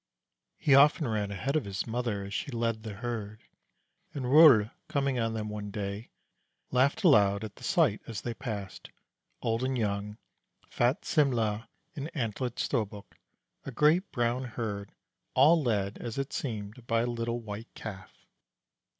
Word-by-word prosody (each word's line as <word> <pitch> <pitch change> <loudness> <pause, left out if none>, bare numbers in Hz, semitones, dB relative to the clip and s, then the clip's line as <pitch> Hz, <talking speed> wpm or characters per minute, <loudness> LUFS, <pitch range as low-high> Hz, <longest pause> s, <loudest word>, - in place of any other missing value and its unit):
He 140 - +3
often 145 +2 +6
ran 105 -3 -1
ahead 115 +9 -2
of 155 - +1
his 100 -1 -3
mother 115 -3 -2
as 100 +1 -7
she 145 - -3
led 115 -3 -1
the 110 -2 -6
herd, 110 -2 -5 0.7
and 135 -3 -3
Rol, 130 -6 +7 0.2
coming 140 -3 0
on 115 -1 -1
them 110 -1 -3
one 105 -1 -5
day, 100 +2 -5 0.6
laughed 130 +7 +2
aloud 100 - +5
at 110 -2 -7
the - - -14
sight 155 - +2
as 115 -3 -5
they 120 - -3
passed, 110 -6 -6 0.5
old 115 +2 0
and 130 0 0
young, 105 -1 -2 0.5
fat 120 +4 0
Simle' 115 -7 +1 0.3
and 145 0 -4
antlered 120 -1 -2
Storbuk, 105 -5 -3 0.5
a - - -6
great 155 - +3
brown 120 0 0
herd, 110 -4 -5 0.4
all 155 +5 +6
led, 105 -6 -1
as 115 0 -5
it 135 0 -3
seemed, 110 -1 -5
by 115 0 +2
a - - 0
little 120 0 -2
White 110 0 -8
Calf. 100 -5 -9
115 Hz, 155 wpm, -29 LUFS, 105-130 Hz, 0.7 s, Rol